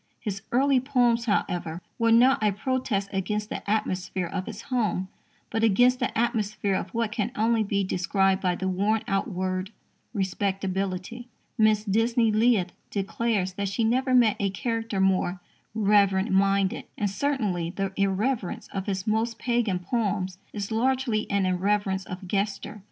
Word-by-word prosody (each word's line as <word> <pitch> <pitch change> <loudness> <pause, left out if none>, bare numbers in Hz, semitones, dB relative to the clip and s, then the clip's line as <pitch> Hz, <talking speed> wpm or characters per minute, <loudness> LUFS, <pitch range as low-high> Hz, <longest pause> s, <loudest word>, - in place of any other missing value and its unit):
His 200 -3 -4
early 270 +2 +4
poems, 245 -3 +2
however, 175 -6 -1 0.2
were 230 0 +3
not 255 +4 +5
a 210 -1 +3
protest 210 -2 -1
against 210 +2 -2
the - - -4
atmosphere 190 -3 -1
of 185 +2 -4
his 225 0 -7
home, 200 -6 0 0.4
but 225 0 0
against 245 +4 +4
the - - -1
atmosphere 215 -4 0
of 190 - -2
what 225 +2 -1
can 220 0 -2
only 225 +1 +2
be 200 -1 0
described 190 +1 +1
by 180 -2 +1
the 190 - -3
worn 205 +4 +1
out 195 -3 0
word 185 0 -2 0.4
"respectability." 195 +2 -2 0.3
Mrs. 215 -1 +3
Disney 225 +1 +3
Leith 215 -4 +3 0.2
declares 200 -1 -1
that 200 +1 -2
she 225 +4 -1
never 255 +3 +2
met 235 -4 +4
a 200 - +1
character 225 0 -2
more 190 -1 +1 0.4
"reverent 200 -1 +3
minded." 195 +2 +2
And, 210 - 0
certainly, 200 -6 -1
the 195 +1 -3
irreverence 200 +2 -1
of 195 0 -5
his 190 -2 -2
most 225 +2 0
pagan 235 -7 0
poems 190 -2 -2
is 205 0 -5
largely 240 -1 0
an 200 -1 +1
irreverence 190 +1 0
of 185 +1 -8
gesture. 205 +2 -2
205 Hz, 150 wpm, -26 LUFS, 190-230 Hz, 0.4 s, not